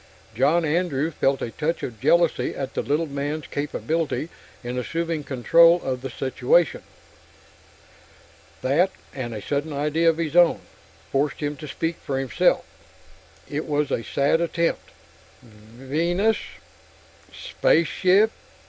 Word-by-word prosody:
John 145 +9 +2
Andrew 160 -1 0
felt 135 -3 0
a 115 - -4
touch 160 +6 -2
of 115 -4 -6
jealousy 170 +4 +2
at 135 -1 -5
the - - -1
little 150 +3 0
man's 145 +1 -4
capability 155 +2 -2 0.3
in 125 +1 -3
assuming 165 +3 -2
control 165 +7 +5
of 130 -1 -3
the 135 - -5
situation. 130 +6 +1 1.8
That, 155 +9 +3 0.2
and 125 -3 -5
a 105 -3 -6
sudden 145 +2 -2
idea 150 +3 +1
of 160 - 0
his 165 -1 -3
own, 175 -1 +5 0.5
forced 140 +1 0
him 145 -1 -2
to 150 - -8
speak 165 +4 -3
for 135 - -4
himself. 135 -2 +1 0.8
It 150 +2 -4
was 150 -1 0
a - - 0
sad 140 +7 +1
attempt. 170 0 -1 0.5
"Venus.... 135 - -1 0.9
Spaceship...." 185 +6 +2
150 Hz, 125 wpm, -24 LUFS, 135-165 Hz, 1.8 s, control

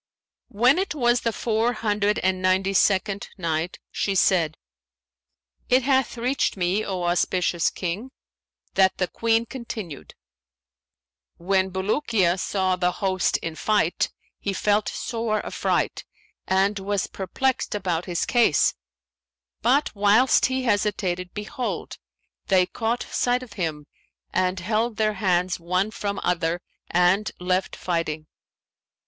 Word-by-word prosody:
When 245 - +3
it 380 -5 -2
was 240 -3 +2
the 230 - 0
Four 225 +2 0
Hundred 210 -2 0
and 185 0 +1
Ninety 190 +1 +2
second 195 +1 +2
Night, 165 -1 -2
She 195 - -1
said, 170 -4 +3 1.1
It 255 0 +4
hath 265 -2 +1
reached 250 -1 0
me, 185 +4 +1
O 185 -3 -3
auspicious 175 -1 +1
King, 190 +8 -4 0.6
that 190 -1 +3
the 185 - 0
Queen 230 +4 +1
continued: 220 - -7 1.2
"When 190 +2 +1
Bulukiya 190 -1 +1
saw 190 -1 0
the 180 0 0
host 190 -2 +1
in 165 - -3
fight, 195 0 +1 0.3
he 200 - -2
felt 205 +2 +1
sore 225 -3 -2
affright - - -1 0.4
and 195 +2 +2
was 200 0 -1
perplexed 255 +7 -2
about 180 -4 -1
his 175 -2 -1
case; 240 -1 +3 0.9
but 270 +5 +2
whilst 210 +5 +4
he 260 0 -1
hesitated, 200 -5 0
behold, 240 +5 -4 0.5
they 185 -2 +4
caught 225 +5 -2
sight 245 +1 +1
of 235 -5 -12
him 160 -6 -3 0.5
and 185 0 0
held 220 +4 0
their 215 -1 +2
hands 180 -2 +1
one 185 +5 0
from 200 -2 -3
other 170 -1 0 0.3
and 180 +4 +3
left 180 +1 -1
fighting. 165 -3 -2
195 Hz, 125 wpm, -24 LUFS, 180-225 Hz, 1.2 s, It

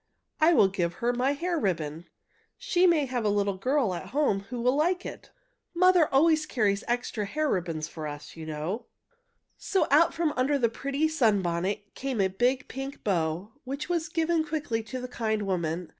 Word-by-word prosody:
I 320 +2 +5
will 205 - +6
give 175 -3 -1
her 240 +1 0
my 255 +3 +1
hair 340 +3 -1
ribbon. 165 - -2 0.5
She 365 0 +2
may 320 -5 +3
have 250 -3 -2
a 210 - +2
little 200 -1 0
girl 255 -1 +1
at 175 - -6
home 275 -7 +1
who 245 0 -4
will 250 +3 +2
like 350 +5 +1
it. - - -8 0.5
Mother 365 -2 +5
always 310 +2 +4
carries 210 -7 +1
extra 240 -3 -1
hair 305 +8 -1
ribbons 165 - -2
for 155 -2 -6
us, 145 0 -8
you 160 -1 -8
know." 160 +10 -4 0.7
So, 385 - +1
out 310 +4 +6
from 325 -3 0
under 270 +3 +2
the 235 -4 +2
pretty 275 +6 -1
sunbonnet 205 - 0
came 265 -4 -3
a 190 -1 +3
big 250 +7 0
pink 270 +1 -7
bow, 175 +1 -1
which 275 +5 -5
was 335 -2 -1
given 330 0 +1
quickly 295 -7 -2
to 225 +4 -6
the 250 - -5
kind 220 -3 -1
woman. 175 -3 -2
245 Hz, 185 wpm, -28 LUFS, 195-300 Hz, 0.7 s, will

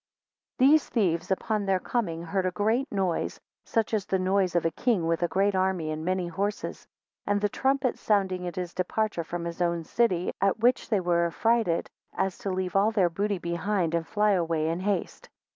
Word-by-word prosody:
4 260 - +5
These 305 0 +4
thieves 180 -5 0
upon 205 +1 -1
their 190 -1 +2
coming 170 -7 -2
heard 185 +2 -1
a - - 0
great 220 +9 0
noise 190 -4 -1 0.3
such 225 -1 0
as 210 -3 0
the 190 - +1
noise 185 -1 +1
of 170 - +2
a 165 - +2
king 210 -2 0
with 165 +1 0
a 175 - +2
great 195 +4 +1
army, 185 -4 0
and 155 0 -4
many 185 0 -1
horse 200 +5 -2 0.6
and 205 0 +2
the 205 - +2
trumpets 265 +2 0
sounding 190 -4 +1
at 175 - -5
his 180 -1 -4
departure 185 0 -1
from 170 +1 -5
his 170 +1 -5
own 170 -1 0
city, 185 -2 +1
at 195 +2 +2
which 245 +3 +2
they 210 -5 +2
were 170 -1 +2
so - - -14
affrighted, 225 -7 +1 0.3
as 190 -1 -1
to 200 - -3
leave 185 -1 -2
all 200 +2 +4
their 200 -6 +2
booty 200 +3 -1
behind 170 +1 -1
them - - +3
and 165 - -11
fly 210 0 +2
away 165 -4 +1
in 165 +2 -2
haste. 195 -1 -2
190 Hz, 210 wpm, -27 LUFS, 170-210 Hz, 0.6 s, 4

